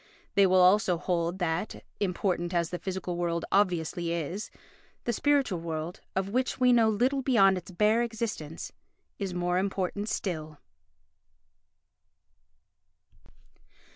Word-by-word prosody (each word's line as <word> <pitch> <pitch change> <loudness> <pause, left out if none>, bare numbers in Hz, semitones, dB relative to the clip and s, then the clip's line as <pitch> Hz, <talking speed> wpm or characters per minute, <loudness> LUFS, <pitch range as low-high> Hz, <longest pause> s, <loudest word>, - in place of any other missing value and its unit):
They 200 -1 +5
will 185 0 +5
also 185 0 +4
hold 175 0 -1
that, 175 +2 -2 0.2
important 180 -2 -1
as 170 -1 0
the 180 - -3
physical 185 -2 -4
world 170 -1 -1
obviously 175 -3 +1
is, 170 +5 -3 0.5
the 240 - -1
spiritual 275 -8 +1
world, 165 +1 -5
of 190 0 0
which 255 +5 -1
we 250 -1 +5
know 230 -2 +5
little 255 +6 +1
beyond 210 -8 +4
its 180 0 -7
bare 210 +5 +2
existence, 220 -9 -4 0.5
is 195 -3 -3
more 180 0 +1
important 200 +2 -2
still. 155 -5 -3
185 Hz, 120 wpm, -28 LUFS, 170-210 Hz, 0.5 s, They